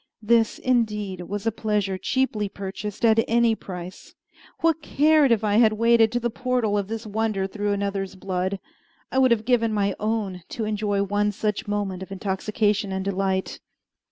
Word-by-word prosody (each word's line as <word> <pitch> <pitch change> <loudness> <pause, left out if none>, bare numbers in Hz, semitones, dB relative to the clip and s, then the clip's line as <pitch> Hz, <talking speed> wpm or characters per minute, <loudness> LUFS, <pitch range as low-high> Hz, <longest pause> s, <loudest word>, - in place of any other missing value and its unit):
This, 225 0 +3
indeed 210 -7 0
was 205 +1 -4
a 225 - +2
pleasure 210 -3 -1
cheaply 215 -1 -1
purchased 200 +2 -4
at 225 0 +5
any 235 0 +3
price. 180 -4 -8 0.5
What 325 -1 +2
cared 300 -2 +3
I - - +7
if 215 - -9
I 210 -1 +2
had 220 -2 +5
waded 230 0 +4
to 240 - +1
the 240 0 -2
portal 250 -3 0
of 200 -2 -1
this 225 +1 -5
wonder 215 -2 -1
through 205 +1 -2
another's 200 -1 -2
blood. 190 +1 -2 0.5
I 265 - +2
would 260 -1 +5
have 225 -2 +1
given 230 -2 +2
my 200 -2 +1
own 210 -4 -2 0.2
to 225 - -1
enjoy 205 -1 0
one 205 +1 0
such 210 +1 -2
moment 200 -3 -2
of 190 - -8
intoxication 205 +1 -1
and 190 0 -3
delight. 190 -1 -1
210 Hz, 175 wpm, -24 LUFS, 195-230 Hz, 0.5 s, I